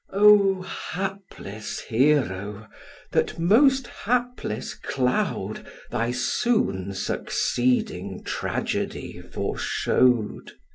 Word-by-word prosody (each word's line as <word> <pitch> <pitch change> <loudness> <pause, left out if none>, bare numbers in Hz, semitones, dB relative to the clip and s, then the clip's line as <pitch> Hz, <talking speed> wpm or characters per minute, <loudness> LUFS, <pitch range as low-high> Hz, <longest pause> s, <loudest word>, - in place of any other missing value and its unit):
O 200 -2 +6
hapless 185 - -5
Hero! 110 -6 +1 0.4
that - - +1
most 255 - +4
hapless 240 - -2
cloud 125 -2 -1 0.3
Thy 120 0 0
soon 125 - 0
succeeding 125 +5 -1
tragedy - - -3
foreshow'd. 120 -4 0
140 Hz, 65 wpm, -25 LUFS, -, 0.4 s, O